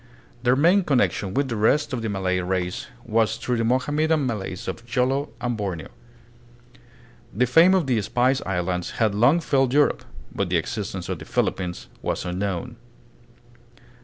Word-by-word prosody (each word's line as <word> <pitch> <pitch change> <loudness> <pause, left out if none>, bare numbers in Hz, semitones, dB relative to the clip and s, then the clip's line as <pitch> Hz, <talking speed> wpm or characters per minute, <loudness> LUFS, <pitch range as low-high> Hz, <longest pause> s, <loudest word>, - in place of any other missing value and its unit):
Their 125 +1 +3
main 175 +8 +4
connection 100 - 0
with 140 0 +1
the 120 - -3
rest 130 +8 +2
of 125 - -2
the 110 - -2
Malay 95 -2 0
race 90 +6 -2 0.2
was 110 -1 +1
through 125 -1 -2
the 115 - 0
Mohammedan 145 +5 +1
Malays 100 -5 -4
of 115 - -5
Jolo 130 +4 0
and 120 -1 -2
Borneo. 95 -7 -4 1.4
The 125 +6 +1
fame 165 +9 +6
of 180 -5 +2
the 125 -5 +1
Spice 125 +6 +1
Islands 90 -1 -2
had 110 -3 +2
long 120 +11 +4
filled 135 -3 +1
Europe, 145 0 +3 0.3
but - - -2
the - - +2
existence - - -4
of - - -4
the - - -9
Philippines 90 -2 -2
was - - -2
unknown. 100 +6 -3
120 Hz, 160 wpm, -24 LUFS, 95-135 Hz, 1.4 s, fame